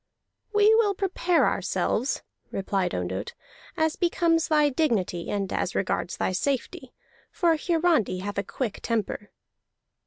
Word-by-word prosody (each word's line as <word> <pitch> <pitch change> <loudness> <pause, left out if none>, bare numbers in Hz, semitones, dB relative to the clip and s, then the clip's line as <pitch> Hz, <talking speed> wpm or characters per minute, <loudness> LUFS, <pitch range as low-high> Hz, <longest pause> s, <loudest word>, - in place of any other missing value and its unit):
"We 420 +1 +5
will 435 -3 +3
prepare 360 -2 +2
ourselves," 250 +5 -1 0.3
replied 195 -2 -1
Ondott, 95 +3 -4 0.4
"as 315 0 +1
becomes 335 -2 +2
thy 300 -2 +4
dignity 225 - 0
and 195 -2 -2
as - - -1
regards - - -1
thy - - 0
safety, 265 - -2 0.4
for 340 -3 +2
Hiarandi 320 - +1
hath 205 0 -3
a - - -1
quick 225 +1 -4
temper." 210 -2 -2
280 Hz, 125 wpm, -26 LUFS, -, 0.4 s, We